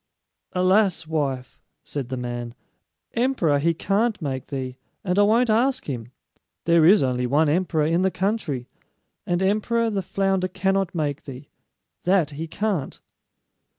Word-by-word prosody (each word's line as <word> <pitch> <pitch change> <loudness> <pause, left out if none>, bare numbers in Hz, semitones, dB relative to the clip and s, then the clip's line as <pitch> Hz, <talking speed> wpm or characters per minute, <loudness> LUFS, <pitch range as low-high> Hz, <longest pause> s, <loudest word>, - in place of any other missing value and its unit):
"Alas, 185 -1 +3
wife," 140 -5 -3 0.2
said 135 -4 -5
the 130 - -3
man, 120 -1 -5 0.6
"emperor 230 - +2
he 165 +4 +2
can't 210 +6 0
make 135 -5 -4
thee, 130 -3 -4 0.3
and 180 +1 +1
I - - +7
won't 225 +3 +4
ask 260 +4 +2
him. 120 -4 -5 0.5
There 170 -1 +5
is 200 -3 +6
only 125 -1 0
one 150 +5 +3
emperor 160 -1 +1
in 165 +3 +2
the 190 - +3
country; 185 - -2 0.6
and 175 +1 +1
emperor 225 +3 +1
the 200 -2 -1
flounder 195 -1 0
cannot 190 0 0
make 150 -3 -2
thee, 135 +1 -9 0.6
that 180 -5 +3
he 155 +3 -5
can't." 190 -5 -2
170 Hz, 145 wpm, -24 LUFS, 140-195 Hz, 0.6 s, I